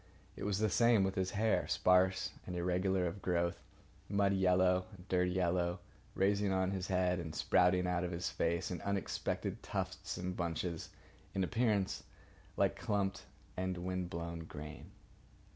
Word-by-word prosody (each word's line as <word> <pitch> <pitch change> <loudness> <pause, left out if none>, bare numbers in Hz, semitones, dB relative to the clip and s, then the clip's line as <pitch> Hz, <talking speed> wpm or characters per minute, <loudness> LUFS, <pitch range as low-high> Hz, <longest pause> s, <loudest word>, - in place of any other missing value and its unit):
It - - -5
was 100 -2 +1
the 110 +1 +2
same 115 -1 +4
with 95 0 0
his 95 -2 0
hair, 110 +2 +1
sparse 95 +1 +3 0.2
and 90 - -4
irregular 90 +1 +1
of 90 +3 -4
growth, 85 -1 0 0.5
muddy 100 -1 +2
yellow 90 -1 +3
and 90 +1 -15
dirty 90 -1 +2
yellow, 90 -1 +1 0.4
rising 100 +1 +2
on 95 0 +1
his 95 -1 -3
head 90 -1 +1
and 80 -2 -5
sprouting 90 +1 +3
out 90 -1 0
of 90 - -1
his 85 0 -3
face 85 +2 -1
in 90 - -4
unexpected 100 -4 -2
tufts 95 0 -4
and 90 0 -3
bunches, 85 -1 -3 0.5
in 95 - +2
appearance 105 -2 +1 0.6
like - - +2
clumped 100 -2 -1 0.3
and 95 0 -2
wind 90 0 -3
blown 85 0 -4
grain. 75 0 -9
90 Hz, 155 wpm, -35 LUFS, 90-95 Hz, 0.6 s, same